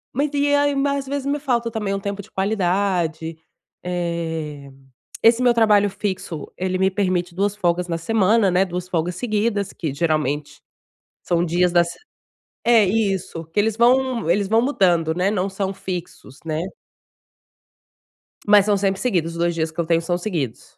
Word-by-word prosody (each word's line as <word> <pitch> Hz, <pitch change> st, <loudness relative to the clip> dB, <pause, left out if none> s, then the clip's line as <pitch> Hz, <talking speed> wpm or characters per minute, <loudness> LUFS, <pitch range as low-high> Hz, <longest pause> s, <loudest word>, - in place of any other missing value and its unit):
Mas 285 Hz, +4 st, 0 dB
e 285 Hz, 0 st, +2 dB
aí 285 Hz, 0 st, +2 dB
mas 280 Hz, 0 st, 0 dB
às -, -, -17 dB
vezes 280 Hz, 0 st, -3 dB
me 285 Hz, +1 st, 0 dB
falta 240 Hz, -5 st, -1 dB
também 210 Hz, -3 st, -2 dB
um 195 Hz, -, -2 dB
tempo 200 Hz, 0 st, -4 dB
de 200 Hz, -, -11 dB
qualidade. 180 Hz, -5 st, 0 dB, 0.5 s
Eh, 165 Hz, -5 st, -3 dB, 0.5 s
esse 230 Hz, +2 st, +5 dB
meu 245 Hz, -1 st, +5 dB
trabalho 210 Hz, -3 st, +4 dB
fixo 185 Hz, -6 st, -4 dB
ele 185 Hz, 0 st, -2 dB
me 190 Hz, 0 st, +3 dB
permite 180 Hz, -3 st, -1 dB
2 200 Hz, +2 st, 0 dB
folgas 175 Hz, -2 st, 0 dB
na 165 Hz, -1 st, -2 dB
semana, 215 Hz, +3 st, +2 dB
né, 180 Hz, +2 st, +3 dB
2 180 Hz, -1 st, -5 dB
folgas 175 Hz, 0 st, -1 dB
seguidas 210 Hz, -3 st, -1 dB
que, 160 Hz, -5 st, -4 dB
geralmente, 150 Hz, -1 st, -1 dB, 0.6 s
são 170 Hz, -1 st, +1 dB
dias 175 Hz, +1 st, +1 dB
da 175 Hz, 0 st, +5 dB
se 170 Hz, -, -8 dB, 0.7 s
é, 230 Hz, -3 st, +6 dB
isso. 195 Hz, -5 st, -1 dB
Que 165 Hz, +5 st, -2 dB
eles 220 Hz, 0 st, +1 dB
vão 245 Hz, -3 st, +2 dB
eles 200 Hz, +2 st, +1 dB
vão 225 Hz, +3 st, +3 dB
mudando, 175 Hz, -, +2 dB
né, 180 Hz, +3 st, +1 dB
não 200 Hz, -2 st, -1 dB
são 195 Hz, 0 st, -3 dB
fixos, 180 Hz, -8 st, -7 dB
né? 155 Hz, 0 st, -2 dB, 1.9 s
Mas 205 Hz, -1 st, +6 dB
são 210 Hz, -, +3 dB
sempre 195 Hz, -1 st, 0 dB
seguidos, 175 Hz, -9 st, 0 dB
os 170 Hz, -, -8 dB
2 170 Hz, 0 st, +1 dB
dias 160 Hz, -1 st, -2 dB
que 160 Hz, -, -11 dB
eu 170 Hz, -, +1 dB
tenho 165 Hz, 0 st, +2 dB
são 175 Hz, +1 st, -1 dB
seguidos. 165 Hz, -, -4 dB
190 Hz, 175 wpm, -21 LUFS, 170-215 Hz, 1.9 s, é